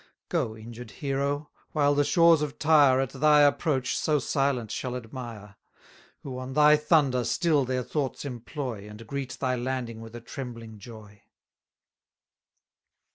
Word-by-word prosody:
Go, 110 0 -1
injured 115 +1 -10
hero! 140 +2 -2 0.2
while 145 -2 +3
the 145 0 +3
shores 165 0 +5
of 150 -1 -3
Tyre 145 -4 +5
At 135 -1 -1
thy 150 +2 +4
approach 145 -2 +2
so 155 -1 +1
silent 135 -6 -1
shall 125 -1 -3
admire, 115 -4 -8 0.7
Who 130 -2 -6
on 130 +1 -6
thy 150 +1 +6
thunder 150 -5 +2
still 145 +4 +1
their 130 0 -1
thoughts 140 +1 -3
employ, 120 -4 -6
And 105 +2 -11
greet 135 +1 -5
thy 130 -2 0
landing 120 -2 -4
with 115 0 -10
a - - -6
trembling 115 -3 -8
joy! 105 -1 -13
130 Hz, 140 wpm, -27 LUFS, 120-145 Hz, 0.7 s, thy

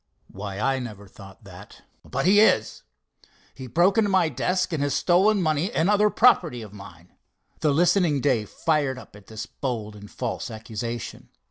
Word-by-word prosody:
"Why, 100 0 -7
I 135 +4 0
never 105 -5 -8
thought 95 +2 -15
that." 95 0 -14 0.2
"But 135 +2 -3
he 200 +3 +5
is. 110 - +2 0.7
He 130 -1 -9
broke 175 - +3
into 210 -2 +2
my 185 -4 +2
desk, 185 +2 -1
and 155 - -1
has 145 -1 0
stolen 190 +3 +3
money 155 +5 0
and 180 -2 +1
other 210 0 +3
property 180 - +3
of 105 -2 -12
mine." 90 -3 -13 0.5
The 155 - +1
listening 170 -1 +2
Dave 125 -7 0
fired 145 -5 -1
up 130 - -13
at 105 -1 -16
this 110 -1 -7
bold 110 -6 -5
and 105 0 -12
false 120 -1 -5
accusation. 115 +1 -7
135 Hz, 170 wpm, -24 LUFS, 110-175 Hz, 0.7 s, he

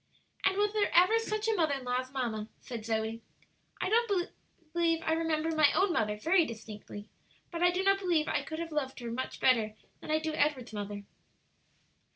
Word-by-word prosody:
"And 385 0 +2
was 415 0 +2
there 425 -2 +2
ever 370 +6 +6
such 430 -1 -2
a 445 - +3
mother 320 -8 +2
in 270 - -6
law 250 0 0
as 255 0 -6
mamma?" 230 -5 -3
said 230 -4 -7
Zoe. 220 0 -1 0.6
"I - - 0
don't 415 -4 +1 0.8
remember 325 0 0
my 305 -2 +5
own 380 -2 +2
mother 210 -6 0
very 335 - +4
distinctly, 210 -4 -8 0.4
but 340 -1 -4
I 355 - +6
do 360 +2 0
not 390 0 +4
believe 345 -5 +1
I - - +1
could 315 - -6
have 335 0 -4
loved 270 -4 -2
her 235 -1 -5
much 255 +3 -4
better 225 -4 +3 0.2
than - - -11
I 310 - +3
do 315 0 -2
Edward's 285 -6 0
mother." 205 -1 -5
310 Hz, 190 wpm, -31 LUFS, 230-360 Hz, 0.8 s, ever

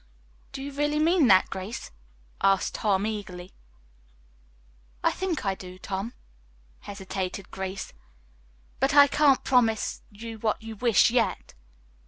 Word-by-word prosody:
"Do 270 - -6
you 285 - -5
really 295 +2 0
mean 320 -1 +4
that, 190 -3 +5
Grace?" 195 +4 -6 0.5
asked 195 -1 +2
Tom 200 -2 +1
eagerly. 190 -4 -6 1.5
"I - - +4
think 370 - -3
I 195 - +1
do, 185 -1 -10
Tom," 195 +5 -5 0.6
hesitated 190 -1 -5
Grace, 190 0 -5 0.9
"but 270 +2 +2
I 285 -1 +10
can't 285 -1 +3
promise 230 -4 +1
you 225 +1 -9
what 215 -1 0
you 225 0 -7
wish, 230 0 +4
yet." 240 -2 0
220 Hz, 125 wpm, -26 LUFS, 195-270 Hz, 1.5 s, I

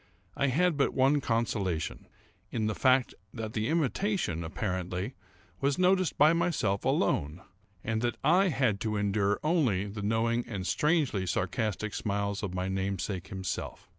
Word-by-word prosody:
I 140 - +1
had 160 +4 +2
but 140 - +1
one 135 +2 +3
consolation—in 110 - -3
the 110 - 0
fact 130 +2 +3 0.2
that 110 -2 -5
the 110 0 -1
imitation, 160 - 0
apparently, 95 +2 -3 0.5
was 140 0 +1
noticed 185 -1 +2
by 150 +3 +6
myself 170 - 0
alone, 75 +6 0 0.4
and 110 0 -1
that 120 -1 -1
I 180 +7 +5
had 130 - +1
to 105 +1 -1
endure 100 0 +1
only 140 - +2
the 105 +1 -6
knowing 115 +3 +1
and 100 -6 -4
strangely 145 - +1
sarcastic 110 +2 -1
smiles 100 -1 -2
of 100 - -3
my 90 0 -1
namesake 95 -1 -2
himself. 95 -2 -5
110 Hz, 140 wpm, -29 LUFS, 95-140 Hz, 0.5 s, by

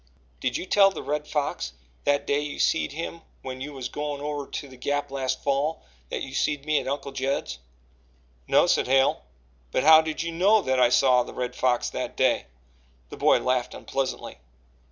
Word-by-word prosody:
"Did - - -1
you - - -5
tell 195 +1 +5
the 195 - -7
Red 150 0 -2
Fox 140 - -2 0.3
that 145 0 +2
day 140 - +1
you 150 0 -5
seed 160 - +1
him 165 +2 -6 0.2
when 130 0 -6
you 145 +2 -5
was 130 -3 -5
goin' 145 +1 -4
over 145 -1 -4
to 145 - -6
the 130 - -13
Gap 145 +3 -2
last 135 -2 -2
fall 145 +3 0 0.3
that - - -3
you 130 - -7
seed 145 0 -1
me 155 -1 +2
at - - -7
Uncle 140 0 -3
Judd's?" 135 +1 -2 0.9
"No," - - +5
said - - +2
Hale. 135 - +3 0.5
"But 130 - +1
how 160 +1 +9
did 160 0 -3
you 170 - -3
know 195 +6 +4
that 130 0 +1
I 125 -1 +5
saw 125 0 +4
the 120 - -7
Red 125 0 -3
Fox 125 -2 +1
that - - -5
day?" - - +2 0.6
The - - -9
boy - - +4
laughed 125 -1 0
unpleasantly. 135 -1 -4
140 Hz, 195 wpm, -26 LUFS, 130-150 Hz, 0.9 s, how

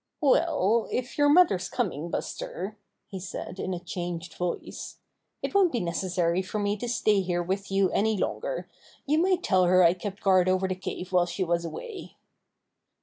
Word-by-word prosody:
"Well, 255 - +3
if 255 +3 -3
your 290 0 +5
mother's 290 - +4
coming, 175 - -2
Buster," 195 +4 -4 0.3
he 195 -2 -7
said 185 0 -7
in 185 - -2
a 180 - -2
changed 175 -1 -5
voice, 180 -1 -5 0.5
"it - - -2
won't 390 -4 +4
be 240 - 0
neces 175 0 -3
sary 175 0 +2
for 190 +3 -5
me 205 0 0
to 240 +3 -4
stay 215 -4 +2
here 175 -1 -1
with 195 +3 -3
you 195 -1 +2
any 220 +1 +1
longer. - - -2 0.4
You 300 +3 +2
might 365 +1 +2
tell 185 -2 +3
her 185 +1 +5
I 170 0 +6
kept 190 +2 -7
guard 185 -2 +4
over 185 +1 +2
the 185 - -1
cave 185 0 -6
while 175 -1 +4
she 175 +2 -2
was 170 -1 0
away." 440 - -8
190 Hz, 185 wpm, -27 LUFS, 180-235 Hz, 0.5 s, I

